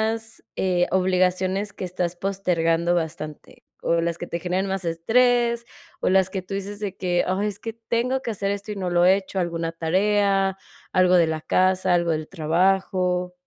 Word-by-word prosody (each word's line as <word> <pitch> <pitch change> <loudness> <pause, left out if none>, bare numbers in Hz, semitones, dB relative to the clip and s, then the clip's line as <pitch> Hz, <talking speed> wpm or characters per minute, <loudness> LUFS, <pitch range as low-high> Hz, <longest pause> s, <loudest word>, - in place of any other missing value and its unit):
las 225 0 -11 0.5
obligaciones 185 +2 +1
que - - -7
estás 180 -1 -2
postergando 175 -3 0
bastante? 155 -2 -5 0.2
¿O 170 0 +2
las 170 0 -1
que 175 - -5
te 170 - -4
generan 185 +3 -1
más 190 -2 -2
estrés, 235 +7 +2 0.4
o - - +2
las 190 0 +3
que 190 -1 -3
tú 195 - -8
dices 200 +1 -5
de 200 -2 -4
que: 180 -2 0
"Ah, 185 +2 0
es 210 -2 -2
que 225 +1 -5
tengo 235 +3 -1
que 235 - -5
hacer 200 -1 -2
esto, 200 +1 -5
y - - -4
no 185 -2 -2
lo 175 0 +4
he 190 - +6
hecho", 190 0 -5
alguna 170 -2 -2
tarea, 195 +3 +1 0.4
algo 185 -1 +4
de 175 -2 +5
la 160 -1 -2
casa, 185 0 +2
algo 170 -1 +1
del 155 -1 -2
trabajo? 180 +1 +1
185 Hz, 185 wpm, -24 LUFS, 175-200 Hz, 0.5 s, he